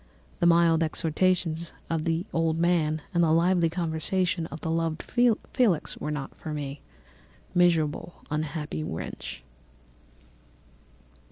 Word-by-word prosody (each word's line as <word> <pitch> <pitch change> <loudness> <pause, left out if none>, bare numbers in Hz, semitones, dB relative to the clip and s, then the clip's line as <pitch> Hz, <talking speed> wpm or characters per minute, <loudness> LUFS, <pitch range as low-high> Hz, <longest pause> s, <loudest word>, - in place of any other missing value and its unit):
The 170 - +4
mild 170 -1 +5
exhortations 165 +1 0
of 165 -2 -1
the 165 +2 0
old 165 -1 +1
man 160 -3 +1
and 170 0 +3
the 160 - +3
lively 170 +1 +3
conversation 170 +1 -1
of 155 +1 -8
the 160 - -2
loved 165 -1 -1
Felix 240 - +1
were - - -5
not 145 -3 -4
for 155 -1 -6
me. 140 -1 -5 0.7
Miserable, 170 -2 +2 0.2
unhappy 155 0 -3
wretch! 80 - -6
165 Hz, 115 wpm, -27 LUFS, 155-175 Hz, 0.7 s, mild